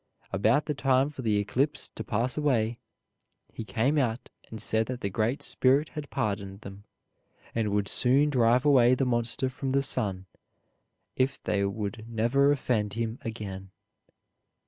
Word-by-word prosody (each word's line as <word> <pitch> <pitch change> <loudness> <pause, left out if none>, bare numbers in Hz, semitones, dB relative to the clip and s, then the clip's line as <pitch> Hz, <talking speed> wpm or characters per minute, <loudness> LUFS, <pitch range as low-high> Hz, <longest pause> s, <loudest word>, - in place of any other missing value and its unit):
About 110 +9 +2
the 150 - -1
time 135 0 +2
for 140 - -8
the 110 -4 +1
eclipse 130 +8 -1
to - - -7
pass 120 +3 -1
away, 120 -6 0 0.7
he - - -6
came 130 +7 +1
out 120 -2 -2 0.2
and 110 - -7
said 110 +1 0
that 125 -1 -5
the 100 - -2
Great 115 +7 -1
Spirit 140 +4 +3
had 150 -2 -7
pardoned 100 -1 -3
them, 100 +1 -11 0.7
and 110 -2 0
would 100 0 0
soon 135 +7 +3
drive 125 0 +3
away 130 -4 +5
the 135 - 0
monster 120 +1 0
from 130 +1 -4
the 140 0 +2
sun 100 -8 -2 0.9
if 130 +2 0
they 100 -1 0
would 105 +3 -4
never 120 +5 +2
offend 115 -7 0
him 115 +1 -3
again. 100 -4 -6
115 Hz, 155 wpm, -28 LUFS, 105-135 Hz, 0.9 s, away